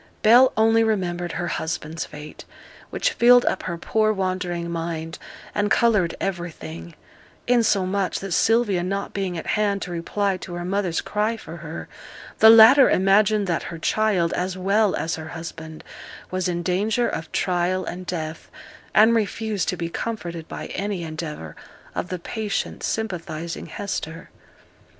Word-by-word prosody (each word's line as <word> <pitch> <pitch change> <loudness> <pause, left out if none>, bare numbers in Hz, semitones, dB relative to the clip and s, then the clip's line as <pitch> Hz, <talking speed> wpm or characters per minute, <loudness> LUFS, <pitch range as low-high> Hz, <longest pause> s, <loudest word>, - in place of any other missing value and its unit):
Bell 245 +4 +7
only 225 +1 +4
remembered 175 -5 -1
her 175 - -2
husband's 160 -1 -3
fate, 150 0 -10 0.5
which - - 0
filled 245 - +6
up - - 0
her 170 -2 -4
poor 215 +5 +1
wandering 185 -3 -2
mind, 165 0 -4 0.3
and 205 0 0
coloured 210 -9 +3
everything; 120 - -5 0.5
insomuch 200 -5 +1
that 195 -1 -6
Sylvia 215 -1 +2
not 195 +3 -3
being 190 -3 -2
at 165 - -6
hand 205 -2 +1
to 180 - -6
reply 190 +3 -1
to 175 -1 -8
her 175 0 -4
mother's 185 -2 -1
cry 215 +2 -1
for 170 -6 -9
her, 165 0 -7 0.5
the 220 - +9
latter 225 +5 +9
imagined 205 +2 +3
that 170 -4 -1
her 170 - -6
child, 185 -1 +1
as 185 +1 -2
well 200 +2 +2
as 165 +1 -2
her 160 0 -7
husband, 160 -1 -8 0.5
was 185 0 -1
in 175 -1 -2
danger 210 +7 +1
of 160 -1 -5
trial 180 0 0
and 180 +2 -6
death, 160 -2 -5 0.5
and 220 +2 +6
refused 220 -2 -1
to 180 - -2
be 170 - -3
comforted 170 -4 -5
by - - -6
any 195 -2 -3
endeavour 155 - -6 0.4
of - - -3
the 185 - -3
patient 205 +3 -3
sympathizing 170 -6 -4
Hester. 165 -5 -5
185 Hz, 150 wpm, -23 LUFS, 170-210 Hz, 0.5 s, the